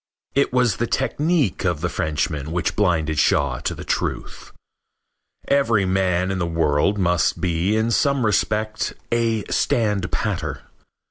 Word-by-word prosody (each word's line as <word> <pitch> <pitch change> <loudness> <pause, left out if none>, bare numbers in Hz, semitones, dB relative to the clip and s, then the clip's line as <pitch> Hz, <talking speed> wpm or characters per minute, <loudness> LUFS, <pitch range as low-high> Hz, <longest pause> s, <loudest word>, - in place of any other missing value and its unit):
It 140 - +2
was 125 -5 +2
the 120 - -1
technique 140 - 0
of 90 -5 0
the 90 - 0
Frenchman 80 -3 -2
which 85 0 -1
blinded 80 -6 +1
Shaw 70 -4 +2
to - - -3
the - - -8
truth. - - -3 1.0
Every 115 -8 +2
man 95 -1 +1
in 95 - -2
the 85 - -1
world 80 +3 +1
must 90 -3 +1
be 90 +3 0
in 110 +1 +1
some 140 +2 +2
respect 110 0 0 0.2
a 115 -2 +1
standpatter. 105 -6 -1
95 Hz, 135 wpm, -22 LUFS, 85-115 Hz, 1.0 s, It